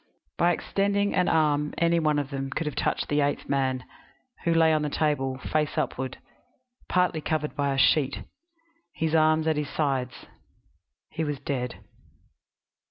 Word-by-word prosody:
By 175 Hz, +1 st, +3 dB
extending 200 Hz, +3 st, 0 dB
an 180 Hz, -1 st, +2 dB
arm 150 Hz, -2 st, +2 dB
any 170 Hz, 0 st, +3 dB
one 155 Hz, -2 st, +2 dB
of 145 Hz, -1 st, -2 dB
them 135 Hz, 0 st, -3 dB
could 160 Hz, +4 st, -3 dB
have 150 Hz, -, -2 dB
touched -, -, -1 dB
the 145 Hz, 0 st, +1 dB
eighth 145 Hz, 0 st, -1 dB
man, 130 Hz, -2 st, 0 dB, 0.6 s
who 170 Hz, -, +3 dB
lay 165 Hz, -1 st, +4 dB
on 155 Hz, -, +2 dB
the 150 Hz, -, -1 dB
table, 140 Hz, -4 st, 0 dB
face 150 Hz, +2 st, -1 dB
upward, 130 Hz, 0 st, -2 dB, 0.7 s
partly 180 Hz, -3 st, +2 dB
covered 150 Hz, -1 st, -2 dB
by 140 Hz, -1 st, 0 dB
a 135 Hz, -, -1 dB
sheet, 135 Hz, 0 st, +3 dB, 0.7 s
his 160 Hz, -1 st, -1 dB
arms 155 Hz, 0 st, +4 dB
at 160 Hz, -2 st, +1 dB
his 150 Hz, -1 st, -2 dB
sides. 135 Hz, -5 st, -2 dB, 0.9 s
He 160 Hz, -, -2 dB
was 145 Hz, -3 st, -3 dB
dead. 125 Hz, -3 st, -4 dB
150 Hz, 160 wpm, -26 LUFS, 140-160 Hz, 0.9 s, lay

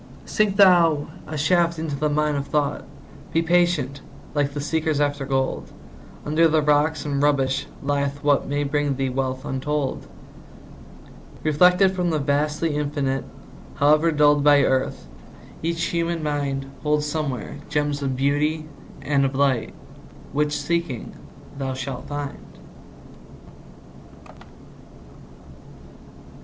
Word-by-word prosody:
Sink 210 Hz, -2 st, +1 dB
thou 170 Hz, -7 st, +5 dB, 0.2 s
a 155 Hz, 0 st, -5 dB
shaft 170 Hz, +3 st, +2 dB
into 155 Hz, -2 st, -3 dB
the 150 Hz, +2 st, 0 dB
mine 150 Hz, 0 st, +1 dB
of 140 Hz, 0 st, -3 dB
thought; 145 Hz, -1 st, -1 dB, 0.5 s
Be 165 Hz, -, +2 dB
patient, 165 Hz, -5 st, +1 dB, 0.3 s
like 145 Hz, -1 st, 0 dB
the -, -, -2 dB
seekers 155 Hz, 0 st, -1 dB
after 145 Hz, -2 st, 0 dB
gold; 135 Hz, -1 st, -1 dB, 0.5 s
Under 155 Hz, +3 st, +4 dB
the 155 Hz, -1 st, +2 dB
rocks 150 Hz, 0 st, +2 dB
and 140 Hz, -1 st, -1 dB
rubbish 135 Hz, -2 st, +1 dB, 0.2 s
lieth 140 Hz, 0 st, -1 dB
what 145 Hz, -1 st, +2 dB
May 145 Hz, +1 st, -1 dB
bring 145 Hz, 0 st, 0 dB
thee 135 Hz, 0 st, -1 dB
wealth 130 Hz, +1 st, -3 dB
untold. 135 Hz, +1 st, -2 dB, 1.4 s
Reflected 180 Hz, +5 st, +4 dB
from 180 Hz, -2 st, -1 dB
the 160 Hz, -, +1 dB
vastly 150 Hz, +2 st, 0 dB
Infinite, 145 Hz, -3 st, -1 dB, 0.5 s
However 155 Hz, +3 st, +4 dB
dulled 145 Hz, -1 st, +4 dB
by 145 Hz, -1 st, +6 dB
earth, 130 Hz, 0 st, 0 dB, 0.6 s
each 165 Hz, +1 st, -1 dB
human 170 Hz, -1 st, -1 dB
mind 140 Hz, -2 st, -2 dB, 0.2 s
Holds 150 Hz, 0 st, +1 dB
somewhere 145 Hz, -6 st, -3 dB
gems 145 Hz, -1 st, -1 dB
of 135 Hz, -2 st, -1 dB
beauty 145 Hz, +4 st, 0 dB, 0.4 s
and 140 Hz, -1 st, +2 dB
of 135 Hz, 0 st, -1 dB
light 135 Hz, -4 st, +1 dB, 0.6 s
Which, 150 Hz, +1 st, 0 dB
seeking, 170 Hz, -8 st, -2 dB, 0.5 s
thou 135 Hz, -1 st, -2 dB
shalt 130 Hz, -1 st, -6 dB
find. 145 Hz, -1 st, -7 dB
145 Hz, 120 wpm, -23 LUFS, 140-155 Hz, 1.4 s, by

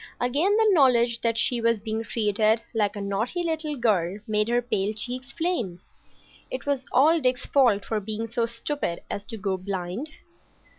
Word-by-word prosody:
Again 300 Hz, -, +2 dB
the 445 Hz, -, +4 dB
knowledge 245 Hz, -7 st, +4 dB
that 230 Hz, -1 st, 0 dB
she 235 Hz, +2 st, +3 dB
was 230 Hz, -1 st, +2 dB
being 220 Hz, +1 st, -3 dB
treated 220 Hz, 0 st, +1 dB
like 210 Hz, -3 st, 0 dB
a 205 Hz, -, -5 dB
naughty 215 Hz, -, -2 dB
little 315 Hz, -2 st, -2 dB
girl 200 Hz, -7 st, +1 dB
made 210 Hz, 0 st, +1 dB
her 240 Hz, +1 st, +2 dB
pale 210 Hz, -4 st, -1 dB
cheeks 250 Hz, +4 st, -6 dB
flame. 270 Hz, -, -2 dB, 0.7 s
It 255 Hz, -, -5 dB
was 280 Hz, -2 st, -1 dB
all 315 Hz, +6 st, +5 dB
Dick's 255 Hz, -1 st, 0 dB
fault 235 Hz, -8 st, +3 dB
for 220 Hz, -, -1 dB
being 215 Hz, +2 st, -4 dB
so 230 Hz, 0 st, -1 dB
stupid 230 Hz, -, -3 dB
as 200 Hz, -, -4 dB
to 225 Hz, -, -7 dB
go 195 Hz, -2 st, -1 dB
blind. 190 Hz, -, -4 dB
230 Hz, 170 wpm, -25 LUFS, 210-260 Hz, 0.7 s, all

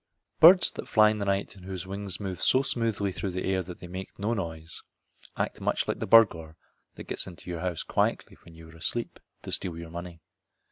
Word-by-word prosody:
Birds 180 Hz, +3 st, +8 dB
that -, -, -8 dB
fly 105 Hz, -1 st, +5 dB
in 110 Hz, -, -3 dB
the 100 Hz, -, -2 dB
night 100 Hz, +1 st, -1 dB
and 95 Hz, -, -14 dB
whose 95 Hz, -2 st, -5 dB
wings 100 Hz, 0 st, -4 dB
move 95 Hz, -5 st, -5 dB
so 130 Hz, -, +4 dB
smoothly 115 Hz, -6 st, 0 dB
through 95 Hz, +1 st, -4 dB
the 90 Hz, 0 st, -4 dB
air 95 Hz, -1 st, +1 dB
that 90 Hz, -1 st, -9 dB
they 90 Hz, -, -8 dB
make 95 Hz, +2 st, -8 dB
no 105 Hz, +3 st, -1 dB
noise 85 Hz, -5 st, -5 dB, 0.6 s
act -, -, -2 dB
much -, -, 0 dB
like -, -, -2 dB
the -, -, -3 dB
burglar 85 Hz, -9 st, +5 dB, 0.4 s
that -, -, -8 dB
gets -, -, -3 dB
into 90 Hz, 0 st, -9 dB
your 85 Hz, -, -4 dB
house 90 Hz, -1 st, -2 dB
quietly -, -, -1 dB
when 85 Hz, -1 st, -15 dB
you 80 Hz, 0 st, -13 dB
are 80 Hz, -, -15 dB
asleep 115 Hz, +8 st, -3 dB, 0.2 s
to -, -, -7 dB
steal 85 Hz, -3 st, +1 dB
your 85 Hz, -1 st, -8 dB
money. 85 Hz, 0 st, -7 dB
95 Hz, 220 wpm, -28 LUFS, 85-105 Hz, 0.6 s, Birds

